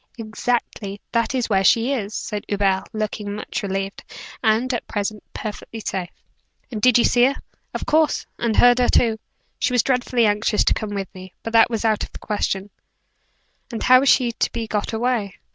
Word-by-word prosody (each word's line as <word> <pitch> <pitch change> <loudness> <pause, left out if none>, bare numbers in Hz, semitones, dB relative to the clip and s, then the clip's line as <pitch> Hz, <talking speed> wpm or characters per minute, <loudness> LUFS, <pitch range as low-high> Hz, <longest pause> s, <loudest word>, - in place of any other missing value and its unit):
"Exactly. 220 -2 -3
That 230 +2 0
is 250 -2 0
where 195 -3 +2
she 235 +6 +4
is," 215 -5 -3
said 210 -1 -4
Hubert, 195 -1 0
looking 215 -2 -3
much 210 +3 -4
relieved. 195 -1 -4 0.4
"And, 230 +4 +2
at 240 - -3
present, 205 0 -3
perfectly 220 +1 -7
safe." 185 -4 -3 0.6
"And 215 -3 -4
did 250 +1 +5
you 240 - +4
see 245 0 +4
her?" 275 +2 +1 0.4
"Of - - -3
course; 310 0 +2
and 230 -2 0
heard 245 0 +6
her 245 - +3
too. 225 -2 +3 0.4
She 255 - 0
was 245 -3 +3
dreadfully 250 -2 +1
anxious 210 +1 +2
to - - +3
come 210 -1 -4
with 195 -1 -5
me; 185 -1 -12
but 225 - -5
that 225 +1 +6
was 230 -1 -2
out 215 -2 +2
of - - -8
the - - -7
question." 205 -1 -2 1.0
"And 230 - -4
how 255 0 +7
is 275 - +3
she 245 -3 +4
to - - -1
be 230 -1 -3
got 210 -2 -2
away?" 225 -3 -1
220 Hz, 195 wpm, -22 LUFS, 205-245 Hz, 1.0 s, how